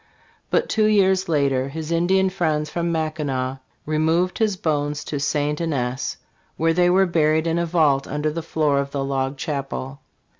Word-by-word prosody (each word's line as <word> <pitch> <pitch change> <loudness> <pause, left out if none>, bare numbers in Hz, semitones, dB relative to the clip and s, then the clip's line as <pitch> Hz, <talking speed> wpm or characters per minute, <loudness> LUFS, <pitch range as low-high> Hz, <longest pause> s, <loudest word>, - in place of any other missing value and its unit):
But - - +1
two 215 -1 +2
years 190 -3 +3
later 140 -4 +1
his 160 +2 -6
Indian 190 +3 +2
friends 155 -5 -1
from 170 0 -1
Mackinac 145 -5 -2 0.3
removed 160 +4 +1
his 215 -4 +1
bones 145 -3 -1
to 145 - -4
St. 145 +2 -1
Ignace, 130 -6 -2 0.4
where 165 +1 +2
they 175 +1 +3
were 190 +2 +4
buried 160 -2 +2
in 165 0 0
a 170 - 0
vault 150 -5 +2
under 150 +1 -1
the 165 +2 -4
floor 155 -3 +1
of 140 0 -2
the 140 -1 -3
log 135 0 -2
chapel. 135 -1 -4
155 Hz, 165 wpm, -22 LUFS, 140-170 Hz, 0.4 s, were